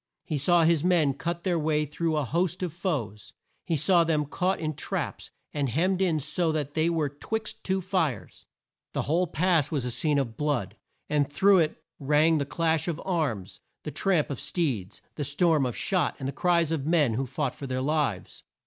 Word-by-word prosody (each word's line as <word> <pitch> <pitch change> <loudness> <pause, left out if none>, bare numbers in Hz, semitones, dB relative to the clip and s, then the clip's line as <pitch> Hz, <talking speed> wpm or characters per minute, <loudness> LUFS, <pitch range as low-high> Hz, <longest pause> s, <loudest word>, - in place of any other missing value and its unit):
He 150 -3 -2
saw 170 +4 +4
his 165 -2 +3
men 170 -6 +3
cut 170 +3 -4
their 175 -3 +1
way 150 -1 +1
through 155 +2 -1
a 150 - 0
host 180 +6 -1
of 175 -4 -3
foes. 130 - -3 0.3
He 165 - +1
saw 170 +3 +4
them 155 -2 +1
caught 180 +6 -1
in 155 -1 -2
traps, 145 - -4 0.2
and 145 -3 -1
hemmed 180 +9 +1
in 170 -5 +2
so 160 +3 0
that 145 -2 -2
they 160 +1 +2
were 160 -3 0
'twixt 215 +10 -4
two 190 0 0
fires. 180 -7 -2 0.5
The - - -1
whole 175 +5 +1
pass 165 -2 +2
was 140 -6 -1
a 125 - -1
scene 145 +5 +1
of 115 -5 -2
blood, 140 -10 -1 0.3
and 145 -1 0
through 195 +4 +5
it 155 -2 -1 0.2
rang 150 +3 +3
the 140 - -2
clash 165 +1 0
of 165 -2 -2
arms, 150 - -2 0.2
the 150 - -5
tramp 160 0 +1
of 135 - -4
steeds, 120 - -2
the 150 - -1
storm 145 0 +2
of 120 - -5
shot, 185 -3 0
and 135 - -4
the 140 - -3
cries 170 -3 +2
of 150 -3 -2
men 155 -8 +3
who 130 +4 -2
fought 130 +1 -2
for 140 - -7
their 130 0 -2
lives. 145 -10 -1
155 Hz, 200 wpm, -27 LUFS, 140-170 Hz, 0.5 s, through